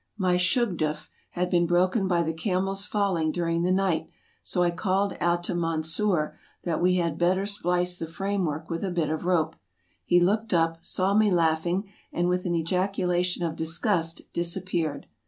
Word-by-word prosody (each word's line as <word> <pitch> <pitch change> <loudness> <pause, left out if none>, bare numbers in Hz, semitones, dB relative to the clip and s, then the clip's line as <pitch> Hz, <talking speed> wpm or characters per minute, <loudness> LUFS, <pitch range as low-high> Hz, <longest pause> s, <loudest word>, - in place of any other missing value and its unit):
My 185 -3 +2
shugdttf 180 -6 0 0.2
had 180 0 -2
been 175 -1 +3
broken 185 +4 +2
by 175 -2 +2
the 160 0 -1
camel's 195 +3 -1
falling 190 -7 +1
during 165 0 0
the 180 +1 +1
night, 185 -4 +1 0.3
so 180 - 0
I 175 - +2
called 190 +2 0
out 175 0 +1
to - - -2
Mansur 165 +1 0 0.2
that 170 -2 -1
we 180 +1 +4
had 170 -3 0
better 185 +3 +2
splice 180 -3 -1
the 165 - -4
frame 195 +4 -2
work 155 0 -3
with 165 +1 -3
a 195 - 0
bit 165 -4 0
of 160 +1 -3
rope; 165 -3 +1 0.5
he 175 - +4
looked 205 +3 +2
up, 165 0 +1
saw 190 +1 0
me 215 0 +4
laughing, 175 +2 +1 0.2
and 175 0 0
with 180 +1 0
an 175 - 0
ejaculation 180 +1 0
of 165 -2 -1
disgust 165 +1 -1
disappeared. 170 -3 -2
175 Hz, 175 wpm, -26 LUFS, 165-190 Hz, 0.5 s, we